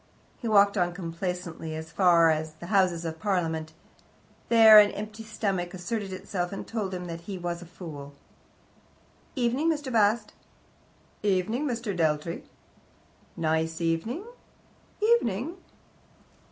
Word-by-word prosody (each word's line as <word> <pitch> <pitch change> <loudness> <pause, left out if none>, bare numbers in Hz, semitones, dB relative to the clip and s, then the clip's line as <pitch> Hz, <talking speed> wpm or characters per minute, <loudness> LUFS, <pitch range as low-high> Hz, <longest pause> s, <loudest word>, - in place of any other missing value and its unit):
He 235 - -4
walked 200 -1 +4
on 175 -1 +1
complacently 170 -2 -5
as 160 0 -7
far 170 -3 +5
as 155 0 -2
the 160 +2 -11
Houses 180 -4 +2
of 160 0 -5
Parliament. 165 -4 -1 0.8
There 220 -2 +9
an 205 -1 +6
empty 215 +2 -7
stomach 195 -5 -2
asserted 195 +2 -4
itself, 185 -1 -3
and 195 - -6
told 205 -5 -3
him 180 0 -6
he 170 +3 -6
was 175 -1 -4
a 175 - -10
fool. 150 -5 -9 1.2
"Evening, 255 +5 +1
Mr. 290 -5 -3
Bast." 210 0 +2 0.9
"Evening, 210 +8 0
Mr. 230 -5 -3
Dealtry." 160 0 -1 0.9
"Nice 160 0 0
evening." 170 - -1 0.8
"Evening." 330 - +1
185 Hz, 120 wpm, -27 LUFS, 165-215 Hz, 1.2 s, There